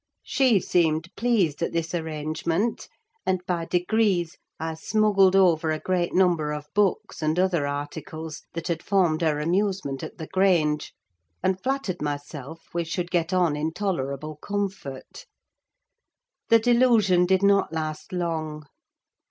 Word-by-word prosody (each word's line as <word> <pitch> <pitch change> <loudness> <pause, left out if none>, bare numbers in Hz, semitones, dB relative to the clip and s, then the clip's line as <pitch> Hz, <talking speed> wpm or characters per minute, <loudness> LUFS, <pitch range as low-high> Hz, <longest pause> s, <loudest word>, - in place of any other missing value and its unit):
She 255 -7 +3
seemed 165 0 0
pleased 205 -11 +1
at 170 - -1
this 165 0 -2
arrangement; 160 +5 -2 0.4
and, 185 -1 -1
by 170 -2 -1
degrees, 180 -1 +1 0.2
I 160 0 -3
smuggled 195 +2 +3
over 170 -4 +4
a 155 - 0
great 180 -1 0
number 175 -5 +2
of 150 -1 -5
books, 205 -4 0
and 155 +2 0
other 180 -6 +2
articles, 155 +2 -6
that 165 0 -5
had 165 -2 -1
formed 180 -6 +2
her 155 -3 +1
amusement 175 -4 -1
at - - -8
the 160 - -6
Grange; 165 -5 +1 0.5
and 190 0 +1
flattered 265 -9 -2
myself 145 +1 -5
we 170 0 0
should 175 +2 -4
get 175 0 0
on 175 -5 +2
in 155 +2 -2
tolerable 155 -6 -3
comfort. 195 - -5 1.2
The 230 - +8
delusion 225 -6 +4
did 190 +1 +2
not 200 -4 +4
last 155 +2 -4
long. 160 -4 -3
175 Hz, 135 wpm, -25 LUFS, 155-190 Hz, 1.2 s, The